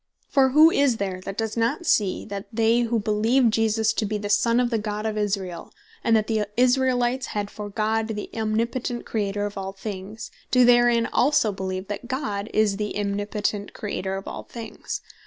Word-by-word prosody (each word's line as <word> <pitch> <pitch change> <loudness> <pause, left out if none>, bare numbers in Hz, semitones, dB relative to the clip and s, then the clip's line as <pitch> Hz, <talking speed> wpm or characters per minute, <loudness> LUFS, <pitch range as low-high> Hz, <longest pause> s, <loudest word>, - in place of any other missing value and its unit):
For 270 -2 +4
who 310 +5 +7
is 280 -7 +2
there 190 -3 -3
that 195 - -5
does 225 -1 -2
not 235 +9 0
see, 205 - +1
that 200 -1 -6
they 225 +1 +3
who 235 -1 +1
beleeve 220 +4 +2
Jesus 220 0 +2
to - - -1
be 210 0 -1
the 205 0 -3
Son 230 +3 +3
of 245 -1 +1
the 225 - +1
God 210 0 -4
of 220 -1 -1
Israel, 195 -5 -3 0.3
and 230 - +4
that 215 -1 +2
the 215 -2 0
Israelites 255 0 +2
had 205 0 -2
for 210 -1 -7
God 220 +2 0
the 210 -2 -4
Omnipotent 230 +2 -2
Creator 205 -2 -1
of 205 -1 -5
all 195 0 -5
things, 205 +3 -7 0.2
doe 250 -1 +5
therein 240 -1 +5
also 255 -5 +3
beleeve, 190 0 -4
that 205 +3 -5
God 215 -6 -3
is 210 -2 +2
the 210 -1 -3
Omnipotent 205 0 -2
Creator 195 -2 -3
of 195 - -6
all - - -5
things? 230 -2 -7
215 Hz, 190 wpm, -24 LUFS, 205-235 Hz, 0.3 s, who